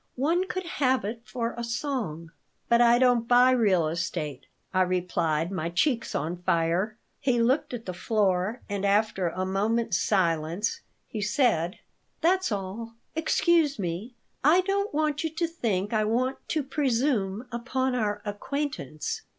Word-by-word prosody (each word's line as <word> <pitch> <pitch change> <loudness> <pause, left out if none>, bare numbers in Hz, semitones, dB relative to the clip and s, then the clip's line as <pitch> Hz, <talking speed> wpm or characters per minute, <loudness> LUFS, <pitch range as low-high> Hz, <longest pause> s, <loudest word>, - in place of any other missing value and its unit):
"One 335 +8 +1
could 370 -1 -4
have 260 -8 +1
it 225 +3 -4
for 235 -2 -3
a 235 - -4
song." 230 - -3 0.4
"But 235 0 +4
I 240 0 +6
don't 245 -2 +3
buy 245 +1 +6
real 200 -10 +3
estate," 155 -4 -3 0.3
I 185 - +3
replied, 175 -3 0
my 175 -3 -2
cheeks 230 - 0
on 165 +5 -2
fire. 175 +6 +1 0.2
He 255 -4 +1
looked 250 +6 +2
at 240 -2 -6
the 185 - -4
floor 195 +2 0
and, 200 -1 -3
after 200 -3 +2
a 185 +3 -3
moment's 210 +2 +1
silence, 170 0 0 0.3
he 215 - -5
said: 200 - +1 0.4
"That's 370 -2 +2
all. 210 +4 -4 0.2
Excuse 320 -2 +2
me. 195 +6 -4 0.3
I 320 +6 +6
don't 400 +2 -1
want 300 0 0
you 320 - 0
to 335 - +1
think 225 - -2
I 215 -1 +2
want 250 +5 0
to 310 -2 0
presume 255 -6 0
upon 260 +2 -1
our 210 -4 -1
acquaintance." 205 - -3
225 Hz, 150 wpm, -27 LUFS, 185-260 Hz, 0.4 s, I